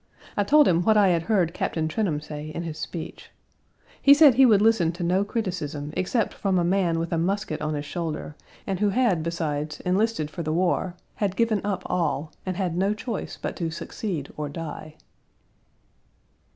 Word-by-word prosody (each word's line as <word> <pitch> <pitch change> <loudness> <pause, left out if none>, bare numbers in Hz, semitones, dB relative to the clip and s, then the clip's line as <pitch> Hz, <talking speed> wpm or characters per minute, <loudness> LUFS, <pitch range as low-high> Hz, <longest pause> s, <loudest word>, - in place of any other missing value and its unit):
I 205 - +2
told 295 +7 +5
him 170 -1 +3
what 215 +3 +4
I 200 -2 +5
had 170 -2 +2
heard 180 -6 +2
Captain 160 -3 -1
Trenholm 160 -4 -1
say 150 0 -7
in 160 +2 -5
his 155 -2 -6
speech. 160 +2 -7 0.7
He 280 0 +8
said 290 -3 +8
he 265 +2 +6
would 210 -4 +5
listen 210 -6 +3
to 175 +1 -5
no 185 +3 +2
criticism 155 - -4
except 220 +5 0
from 195 -2 0
a 175 - +2
man 175 -2 +1
with 165 +1 -2
a 165 - +1
musket 190 -1 -1
on 150 0 -1
his 145 0 -4
shoulder, 160 -2 -4 0.3
and 195 -2 -2
who 210 0 +3
had 215 -6 +2
beside 155 -2 -3
enlisted 185 -4 0
for 170 - -5
the 155 -1 -2
war, 180 +1 0 0.2
had 200 -2 -1
given 225 -3 +1
up 200 -2 -2
all, 155 -3 -1 0.2
and 185 -1 -2
had 180 -4 -1
no 195 +4 +1
choice 220 0 -5
but - - -4
to 170 -3 -2
succeed 160 -1 -5
or 150 -1 -3
die. 155 0 -7
175 Hz, 190 wpm, -25 LUFS, 155-205 Hz, 0.7 s, He